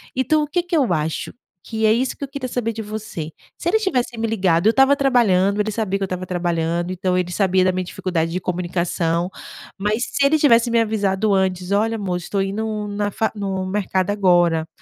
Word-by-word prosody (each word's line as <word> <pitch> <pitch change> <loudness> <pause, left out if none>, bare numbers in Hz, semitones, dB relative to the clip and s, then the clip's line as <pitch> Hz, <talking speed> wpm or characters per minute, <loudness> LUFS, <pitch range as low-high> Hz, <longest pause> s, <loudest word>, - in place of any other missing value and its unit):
Então, 300 +4 +2
o - - -3
que 350 +4 0
que 350 0 -3
eu 255 - +2
acho 155 -1 -2 0.3
que 220 -1 -2
é 215 - +5
isso 250 +3 0
que - - -7
eu - - -3
queria 275 -1 -5
saber 240 -2 -2
de 225 0 -6
você 215 -7 -6 0.3
se - - -5
ele 440 +6 +3
tivesse 250 - -1
me 225 - -1
ligado? 190 -4 +2
Eu - - +6
estava 270 +3 +5
trabalhando, 210 -8 +2
ele 210 +1 0
sabia 205 -2 -1
que - - -2
eu - - +2
estava 185 -1 -4
trabalhando, 175 -1 -1
então 185 0 -1
ele 180 -1 -1
sabia 190 -1 +2
da 185 - +3
minha 185 0 -2
dificuldade 170 -2 -2
de 180 - -2
comunicação 175 -1 -1 0.5
mas 210 +4 0
se 280 - +1
ele 300 +3 +4
tivesse 240 -5 +4
me 230 - +3
avisado 210 -2 +1
antes: 185 -1 0
"Olha, 220 +3 +2
amor, 190 -5 -2
estou 195 +3 -2
indo 210 +2 -3
na 205 0 -2
fa 220 +2 -1
no 195 -2 -3
mercado 190 -1 -1
agora, 175 -5 +3
200 Hz, 215 wpm, -21 LUFS, 180-225 Hz, 0.5 s, Eu